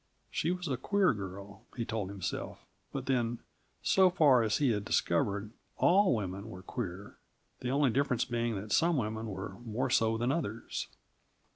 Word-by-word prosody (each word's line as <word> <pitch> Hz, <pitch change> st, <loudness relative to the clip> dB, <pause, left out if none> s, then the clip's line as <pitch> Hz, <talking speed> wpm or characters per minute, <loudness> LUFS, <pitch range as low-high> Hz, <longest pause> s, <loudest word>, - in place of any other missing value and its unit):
She 160 Hz, -, 0 dB
was 180 Hz, 0 st, -2 dB
a 130 Hz, -3 st, -1 dB
queer 195 Hz, +5 st, +2 dB
girl, 100 Hz, +1 st, -8 dB
he 115 Hz, -, -1 dB
told 110 Hz, -4 st, -3 dB
himself; 95 Hz, -3 st, -5 dB, 0.3 s
but 135 Hz, -2 st, -4 dB
then, 120 Hz, -3 st, +1 dB, 0.5 s
so 190 Hz, -1 st, +5 dB
far 145 Hz, -8 st, +5 dB
as 110 Hz, -1 st, +1 dB
he 140 Hz, -4 st, +3 dB
had 105 Hz, -2 st, -1 dB
discovered, 100 Hz, +1 st, 0 dB, 0.3 s
all 190 Hz, -4 st, +5 dB
women 100 Hz, 0 st, -4 dB
were 90 Hz, -3 st, -9 dB
queer; 100 Hz, -2 st, -6 dB, 0.4 s
the 125 Hz, -, -3 dB
only 140 Hz, -1 st, +3 dB
difference 130 Hz, -2 st, +1 dB
being 120 Hz, -2 st, -1 dB
that 105 Hz, +2 st, -6 dB
some 165 Hz, +5 st, +3 dB
women 110 Hz, -1 st, -2 dB
were 95 Hz, -1 st, -6 dB
more 120 Hz, +3 st, -2 dB
so 115 Hz, -2 st, +3 dB
than 120 Hz, +3 st, +1 dB
others. 120 Hz, -8 st, -3 dB
115 Hz, 165 wpm, -32 LUFS, 100-135 Hz, 0.5 s, so